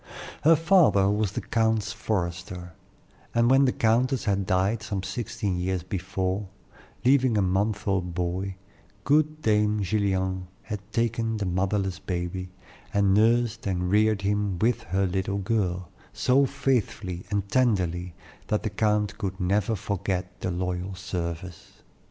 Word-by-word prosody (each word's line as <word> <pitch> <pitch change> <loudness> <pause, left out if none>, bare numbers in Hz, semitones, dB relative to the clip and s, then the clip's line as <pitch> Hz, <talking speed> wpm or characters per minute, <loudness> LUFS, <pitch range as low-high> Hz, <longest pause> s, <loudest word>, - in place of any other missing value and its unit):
Her 165 +2 +7
father 155 - +4
was 105 -2 0
the - - -2
count's 110 -2 0
forester, 90 -3 -3 0.6
and 120 +1 +4
when 135 +1 +6
the 130 - +3
countess 125 +4 +2
had 100 -3 0
died 95 +4 +1
some 105 -3 -3
sixteen 100 -1 -3
years 90 -1 -1
before, 95 +1 -2 0.6
leaving 130 -3 +4
a - - +3
month 100 +3 0
old 90 -3 0
boy, 90 +2 -2 0.5
good 155 +3 +2
dame 105 -1 +2
Gillian 95 -2 0 0.2
had 105 - -4
taken 115 0 0
the 105 - -2
motherless 95 +1 0
baby, 90 0 -4 0.4
and 100 -1 +3
nursed 115 +1 +2
and 90 -1 -1
reared 105 -1 +3
him 100 -1 0
with 115 +5 +1
her 95 +3 +1
little 95 +2 -1
girl, 95 -4 -1 0.2
so 135 +2 +3
faithfully 115 -10 -1
and 100 -1 -1
tenderly 90 -7 +1 0.3
that 105 - 0
the 110 - -2
count 105 0 +1 0.3
never 100 +4 +1
could - - -2
forget 95 -2 -3
the - - -1
loyal 90 +1 -3
service. 85 -1 -6
100 Hz, 140 wpm, -26 LUFS, 90-110 Hz, 0.6 s, Her